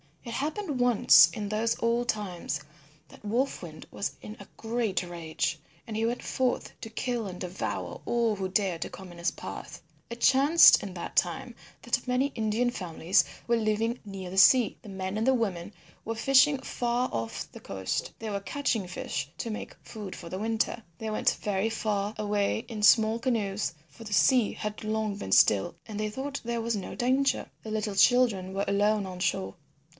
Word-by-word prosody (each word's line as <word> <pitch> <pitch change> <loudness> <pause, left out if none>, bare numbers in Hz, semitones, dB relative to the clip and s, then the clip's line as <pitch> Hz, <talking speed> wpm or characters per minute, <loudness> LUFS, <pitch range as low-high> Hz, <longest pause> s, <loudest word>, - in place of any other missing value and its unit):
It 235 - -6
happened 300 - -2
once 245 -3 +7
in 210 -2 -5
those 220 +2 0
old 235 +1 +1
times 180 -7 -2 0.5
that - - -16
Wolf 245 +6 0
Wind 155 -3 -10
was 200 - -3
in 215 - -8
a - - -11
great 225 -4 -1
rage, 170 -2 -3 0.3
and 220 - -6
he 220 +1 0
went 240 +2 -2
forth 255 -1 -1
to 225 - -6
kill 235 -1 -2
and 180 -1 -7
devour 180 0 -4
all 235 -2 +1
who 190 -1 -3
dared 185 -3 0
to - - -7
come 190 -2 -10
in 175 - -12
his 170 - +1
path. - - -8 0.3
It 235 0 -7
chanced 280 +5 +7
in 195 -2 -6
that 170 - -6
time - - 0 0.3
that - - -1
many 250 +2 +2
Indian 225 +2 0
families 180 -3 +1 0.2
were 235 - +3
living 225 +2 0
near 195 -2 -7
the 190 - -6
sea. 235 +4 +6
The 210 - -11
men 190 +1 -4
and 255 +2 +3
women 190 -4 -2 0.3
were 225 - -3
fishing 275 +4 +4
far 245 -1 -1
off 115 0 -4
the - - -11
coast. 95 -1 -3
They 225 - -5
were 200 -1 -2
catching 225 -3 -1
fish 145 -6 -4
to 230 - -3
make 215 - -6
food 210 -4 -8
for 170 - -9
the 185 - -4
winter. 225 +1 -1 0.2
They 220 - -4
went 215 - +1
very 205 +1 0
far 210 -2 -2
away 210 +1 0
in 225 -3 -6
small 220 +2 +5
canoes, 210 -7 -1
for 230 - -14
the 210 -2 -6
sea 245 +1 +4
had 210 0 -5
long 215 -1 -1
been 95 - -6
still 100 0 +4
and 215 -2 -6
they 215 0 -1
thought 275 +5 -5
there 235 0 -2
was 230 0 -1
no 200 - -5
danger. 265 +2 +1
The 220 - -6
little 215 -2 -2
children 195 -3 +3
were 195 +1 -1
alone 205 +1 +2
on 185 -1 -7
shore. 95 - -1
215 Hz, 190 wpm, -28 LUFS, 195-235 Hz, 0.5 s, once